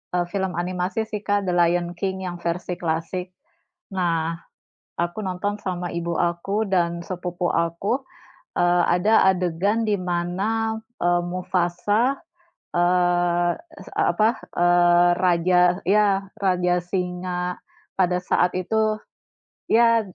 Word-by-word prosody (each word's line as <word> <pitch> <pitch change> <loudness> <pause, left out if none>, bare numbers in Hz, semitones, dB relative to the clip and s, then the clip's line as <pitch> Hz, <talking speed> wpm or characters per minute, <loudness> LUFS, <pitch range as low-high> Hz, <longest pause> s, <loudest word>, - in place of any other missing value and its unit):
eee, 175 - +2
film 190 -2 -2
animasi 180 +5 -2
sih, 215 -1 -5
Kak, 205 0 +2
The 185 - -1
Lion 175 0 +2
King 190 -1 -2
yang 175 -1 -5
versi 175 +1 -3
klasik. 180 +2 -3 0.6
Nah, 165 -3 0 0.7
aku 175 +5 -2
nonton 190 +2 -2
sama 180 -2 -3
ibu 170 -1 -2
aku 195 +5 0
dan 170 -3 +1
sepupu 180 -1 -3
aku, 170 +11 0 0.5
eee, 175 0 +3
ada 190 +5 +4
adegan 190 +4 +1
di 210 -3 +1
mana, 190 +6 -1 0.2
eee, 175 0 +3
Mufasa, 185 +7 0 0.6
eee, 175 0 +2 0.2
es - - -11
eee, - - +1
apa, 215 +1 +3 0.3
eee, 175 0 +5
raja 180 0 +3 0.2
ya 200 0 +3 0.2
raja 180 -2 +2
singa 180 0 -3 0.3
pada 180 -1 +1
saat 180 0 +1
itu 215 +3 0 0.7
ya, 230 0 +5
180 Hz, 120 wpm, -23 LUFS, 175-195 Hz, 0.7 s, eee